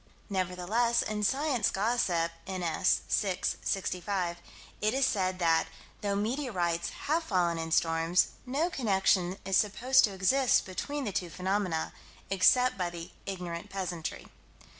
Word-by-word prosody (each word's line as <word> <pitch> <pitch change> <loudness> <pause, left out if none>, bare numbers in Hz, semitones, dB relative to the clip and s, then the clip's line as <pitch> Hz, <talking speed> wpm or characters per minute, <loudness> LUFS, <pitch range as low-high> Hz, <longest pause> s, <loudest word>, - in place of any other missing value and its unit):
Nevertheless, 190 +6 +1
in 210 0 -3
Science 265 0 +1
Gossip, 190 -6 +1 0.2
n.s., 180 -4 +1
6 190 -3 0
65, 185 -2 -2 0.4
it 215 +4 +1
is 270 0 +3
said 185 -6 0
that, 165 -3 +2 0.3
though 200 -1 0
meteorites 200 - -1 0.2
have 315 +3 +2
fallen 175 - +1
in 165 0 -4
storms, 165 +1 +2 0.2
no 300 +8 0
connection 195 - +1
is 195 -1 +2
supposed 255 +6 +4
to 205 - -5
exist 250 +8 +3
between 285 +10 -4
the 210 - -2
two 180 -2 -2
phenomena, 185 -2 -1 0.4
except 195 +4 +4
by 180 -1 0
the 170 +1 -8 0.2
ignorant 175 -3 -5
peasantry. 180 -4 -4
190 Hz, 130 wpm, -30 LUFS, 175-230 Hz, 0.4 s, supposed